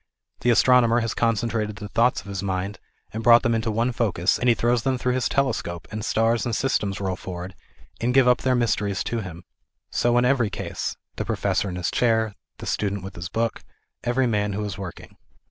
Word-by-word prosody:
The 120 - +1
astrono 125 0 +5
mer 120 +1 +3
has 115 -2 -2
concentrated 115 -2 0
the 105 -1 -7
thoughts 115 +4 +2
of - - -21
his 100 -2 -4
mind, 95 +1 -3 0.3
and 110 - -3
brought 120 0 +7
them 120 - +2
into 115 0 0
one 115 +3 +1
focus, 100 -7 +1
and 125 - +2
he 120 - +5
throws 120 0 +1
them 130 +2 0
through 125 0 0
^ - - +1
his 130 -1 0
telescope, 90 -11 -1
and 110 0 -4
stars 115 +1 +1
and 120 -2 -1
systems 105 -7 0
roll 95 -2 -1
forward 90 +1 -7 0.5
and 120 +1 +1
give 130 0 +5
up 125 0 +5
their 130 -1 +2
mysteries 105 -4 0
to 120 - -2
him. 90 -4 -7 0.5
So 120 0 +2
in 120 - +4
every 125 -4 +2
case - - -4
ŌĆö - - -50
the - - -2
professor 100 - 0
in 90 - -5
his 90 -1 -2
chair, 110 -3 +2 0.2
the - - -8
student 100 -2 -1
with 95 0 -7
his 85 0 -6
book, 115 +2 -1 0.4
every 125 +2 +1
man 105 -3 0
who 105 +2 -2
is 100 -4 -4
working. 95 -2 -9
115 Hz, 220 wpm, -24 LUFS, 100-120 Hz, 0.5 s, brought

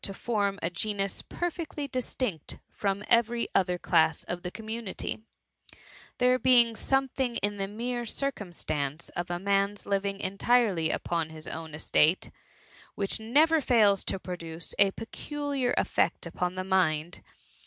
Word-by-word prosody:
SS - - -1
to 195 - -6
form 200 -4 0
a - - 0
genus 200 +1 -1
perfectly 335 -4 -4
distinct 250 - -3
from 200 0 -1
every 235 0 +3
other 180 -2 +2
class 160 -3 +2
of 175 0 -4
the 180 - -4
community; 220 +1 -5 1.0
there 250 +1 +4
being 240 -3 +5
something 265 -1 0
in 205 -1 -1
the 195 0 -2
mere 240 +4 -3
circumstance 170 - -3
of 175 +1 -4
a 175 - -1
man^s 200 +2 0
Uving 200 0 0
entirely 200 -3 +2
upon 165 -1 -1
his 155 -1 -9
own 160 -1 -6
estate^ 155 +2 +2 0.6
which 195 +1 0
never 300 +8 +4
fails 210 -7 +4
to - - -1
produce 170 -3 -6
a 200 -1 +7
peculiar 275 +5 -3
effect - - +1
upon 180 0 -2
the 185 - -2
mind. 175 -3 +1
200 Hz, 140 wpm, -29 LUFS, 180-240 Hz, 1.0 s, a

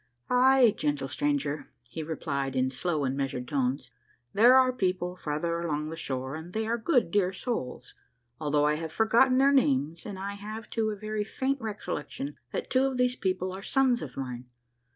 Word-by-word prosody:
" - - -39 0.2
Ay, 260 -5 +6
gentle 145 -2 -1
stranger," 145 +2 -1 0.2
he 125 +7 -6
replied 140 -4 -3
in 130 0 +1
slow 155 +3 -1
and 130 0 0
measured 135 -2 -3
tones, 130 -3 -1 0.2
" 120 0 -39
there 235 +5 +7
are 255 -1 +4
people 180 -5 -1
farther 170 +1 -2
along 155 -2 -2
the - - -5
shore, 130 -4 -4
and 160 +3 -8
they 220 0 -1
are 230 +1 0
good, 235 - +1
dear 190 -2 +2
souls, 180 - -4 0.5
although 150 -1 +2
I 150 0 +2
have 160 0 -5
forgotten 235 +6 +4
their 275 +1 +5
names, 155 - +2
and 200 -2 -6
I 200 +1 -4
have, 215 +2 -8
too, 220 -1 0
a 215 - -3
very 215 +1 -3
faint 265 +5 -2
recollection 150 -9 -5 0.2
that - - -4
two 260 +1 +4
of 265 -2 -1
those 250 0 +2
people 185 -3 -1
are 190 - -7
sons 255 +2 +2
of 135 - -8
mine. 125 -2 -5
170 Hz, 195 wpm, -28 LUFS, 140-220 Hz, 0.5 s, there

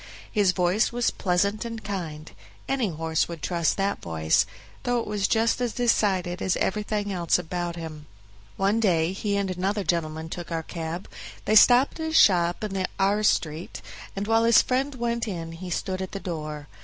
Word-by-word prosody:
His 205 -4 +3
voice 180 +4 +2
was 240 0 +1
pleasant 200 +4 0
and 230 -1 -6
kind; 165 -6 -5 0.4
any 260 -6 0
horse 160 -1 -1
would 170 -3 -8
trust 170 -3 0
that 200 0 -1
voice, 80 -1 +1 0.3
though 245 0 0
it - - -3
was 205 -1 0
just 225 +2 +2
as 240 -2 -1
decided 195 -7 +1
as 190 - +1
everything 205 0 -1
else 170 -3 +2
about 175 0 -3
him. 155 -3 -8 0.5
One 200 +3 +2
day 175 -5 +2
he 200 +1 -1
and 195 -2 -1
another 195 +3 -1
gentleman 160 -2 -1
took 175 +1 -7
our 165 -1 -2
cab; 165 +2 -5 0.4
they 215 - +1
stopped 245 +7 +6
at 320 0 -2
a - - -5
shop 175 - +4
in 195 -3 -1
R 200 +2 +2
Street, 160 -5 -1 0.3
and 200 +1 -2
while 225 +1 +3
his 230 -1 +6
friend 265 +2 -1
went 235 -1 -1
in 165 -5 -4
he 175 +2 -8
stood 185 +2 -2
at 190 - -5
the 195 - -3
door. 155 -5 -5
190 Hz, 180 wpm, -26 LUFS, 170-215 Hz, 0.5 s, stopped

